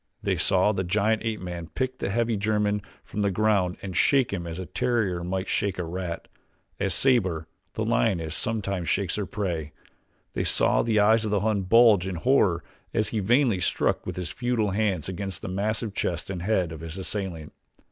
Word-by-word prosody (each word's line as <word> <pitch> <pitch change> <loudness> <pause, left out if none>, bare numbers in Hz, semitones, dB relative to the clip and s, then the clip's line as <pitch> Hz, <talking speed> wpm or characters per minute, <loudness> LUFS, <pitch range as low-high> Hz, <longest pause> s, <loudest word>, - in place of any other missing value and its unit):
They - - +1
saw 95 +2 +3
the 95 -2 -1
giant 110 +4 +1
ape 110 -3 -2
man 85 -2 -5
pick 130 0 -2
the - - -2
heavy 115 +2 +1
German 105 0 +1 0.2
from 105 - -4
the 100 - +2
ground 100 -2 +1
and 95 -2 -5
shake 135 -6 +3
him 85 -3 -3
as 80 0 -5
a 95 - -5
terrier 100 -3 0
might 95 +2 -2
shake 100 -2 0
a 90 - -2
rat 85 0 -5 0.5
as 100 -3 0
Sabor, 95 -12 +2 0.3
the - - -1
lioness, 80 +4 +1
sometimes 100 -6 -2
shakes 95 -1 0
her 105 - -2
prey. 85 -7 -3 0.6
They - - -1
saw - - +3
the 110 -2 +2
eyes 110 +2 +5
of 110 - -1
the 100 -2 +1
Hun 105 -2 +1
bulge 105 -1 +5
in 95 - -3
horror 90 -4 +2 0.3
as 110 - +2
he 110 - -1
vainly 120 0 +3
struck 90 - 0
with - - -3
his 90 -2 -4
futile 120 -5 0
hands 95 -5 0
against 95 0 -5
the - - -4
massive 105 +3 -1
chest 90 -2 -2
and 90 -3 -4
head 90 -3 +1
of 80 - -7
his 80 +2 -7
assailant. 95 -5 -4
100 Hz, 195 wpm, -26 LUFS, 90-110 Hz, 0.6 s, eyes